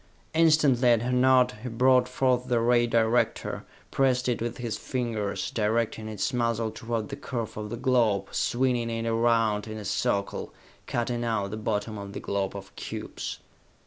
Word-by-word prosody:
Instantly, 150 -6 +4
at 115 -1 +4
her 125 - -1
nod, 125 0 +4
he 125 - -5
brought 125 +2 +4
forth 125 -1 +1
the 120 -1 +2
ray 120 +1 +3
director, 115 +1 +1 0.3
pressed 130 -2 +2
it 120 -3 0
with 120 0 -3
his 120 -3 -3
fingers, 115 -6 -3
directing 110 0 0
its 110 +4 -2
muzzle 115 -2 0
toward 115 0 -4
the 140 - -4
curve 120 -5 -5
of 105 0 -5
the 120 - -4
globe, 115 -6 +2
swinging 120 -2 0
it 115 0 -3
around 115 -2 +2
in 110 0 -6
a 105 - -7
circle, 100 +1 -1 0.4
cutting 120 0 -1
out 105 -4 -1
the - - -3
bottom 110 0 -2
of 100 0 -8
the - - -5
globe 100 0 -2
of 95 -1 -9
cubes. - - -6
115 Hz, 170 wpm, -27 LUFS, 110-125 Hz, 0.4 s, Instantly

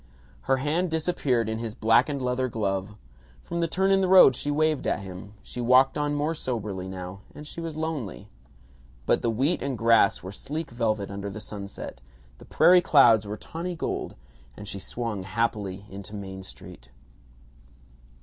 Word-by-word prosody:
Her 135 - +4
hand 155 +7 0
disappeared 155 -8 0
in 110 0 -2
his 115 -2 -5
blackened 125 +5 +2
leather 125 +1 0
glove. 105 -3 -2 0.5
From 170 - -4
the 170 - +1
turn 190 +4 +1
in 195 0 +4
the 190 - +2
road 185 -8 +8
she 145 - -3
waved 155 -1 +1
at - - 0
him. 95 +2 -9
She 125 - -6
walked 130 +2 +5
on 145 0 0
more 150 +3 0
soberly 105 - -4
now, 95 +1 -7
and 150 - -9
she 165 - -8
was 165 -2 -5
lonely. 150 - -4 0.8
But - - +2
the 115 - +1
wheat 135 +10 +1
and 135 -3 -2
grass 115 -3 +4
were 95 - -6
sleek 150 +9 -5
velvet 110 -4 -1
under 100 0 -5
the 100 - -7
sunset; 100 - -7 0.4
the - - -13
prairie 180 0 +5
clouds 120 - +5
were 105 +1 -4
tawny 170 +7 -5
gold; - - -3 0.4
and 105 - -9
she 100 - -5
swung 115 -1 -4
happily 100 -1 -2
into 100 +1 -9
Main 95 -1 -7
Street. - - -11
115 Hz, 170 wpm, -26 LUFS, 100-150 Hz, 0.8 s, road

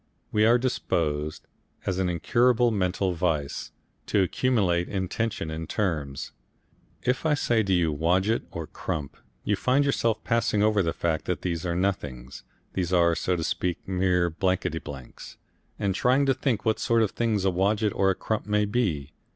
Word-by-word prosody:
We 105 +1 +4
are 120 +2 +6
disposed, 75 - -1 0.4
as 95 -1 -1
an 95 -1 +1
incurable 120 +7 +3
mental 95 -2 0
vice, 80 -5 -2 0.4
to 100 - +3
accumulate 95 -5 +1
intension 95 -2 -2
in 80 0 -5
terms. 75 -9 -2 0.7
If 125 +1 0
I 155 -2 +3
say 120 -5 +2
to 100 -3 -1
you 85 -4 +2
Wodget 90 +8 +1
or 80 - -5
Crump, 75 -2 -5 0.3
you 105 - +1
find 130 +7 +2
yourself 115 -5 0
passing 115 -2 +1
over 105 -1 +3
the 85 -3 0
fact 80 -2 -1
that - - -2
these 85 0 -2
are 85 - -1
nothings, 70 -9 -3 0.3
these 90 -2 -1
are, 85 -2 +4
so 90 +2 0
to 85 - -2
speak, 85 +1 -2
mere 90 -2 +1
blankety 90 -1 0
blanks, 65 -5 -10 0.4
and 100 -2 0
trying 130 +7 +3
to 135 - +3
think 130 -5 -1
what 110 -1 +1
sort 115 -1 +3
of 105 - 0
thing 115 -2 0
a 95 - +3
Wodget 100 +3 +1
or 95 - +2
a 95 - +2
Crump 110 +2 -3
may 105 0 +2
be. 95 - -1
95 Hz, 170 wpm, -26 LUFS, 85-110 Hz, 0.7 s, are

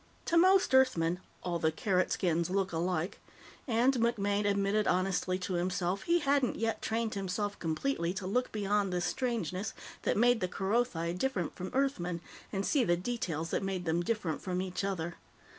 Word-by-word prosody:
To 340 - 0
most 375 -1 +5
Earthmen, 180 -10 +4 0.2
"all 175 -1 -1
the 160 0 +2
Carrot 185 +2 +1
skins 170 -2 +1
look 195 0 0
alike," 175 +1 -1 0.5
and, 245 +2 +3
MacMaine 205 -3 +1
admitted 200 +1 +1
honestly 185 0 +1
to 185 0 -4
himself, 180 +2 0
he 340 - +3
hadn't 280 -5 +2
yet 225 0 -1
trained 225 0 -1
himself 200 +1 -2
completely 170 - -1
to 190 - -4
look 250 +7 0
beyond 205 -2 0
the 180 - 0
strangenesses 215 - -2 0.3
that - - 0
made 245 +1 +4
the 185 - 0
Kerothi 190 -3 0
different 180 - -1
from 185 +1 -5
Earthmen 215 -11 0 0.3
and 195 -1 -1
see 280 -4 +3
the 175 -5 +2
details 175 -6 -3
that - - 0
made 190 -2 -3
them 165 +1 +1
different 175 -5 -2
from 180 -1 -2
each 185 +1 -3
other. 175 -4 -2
195 Hz, 170 wpm, -31 LUFS, 180-230 Hz, 0.5 s, most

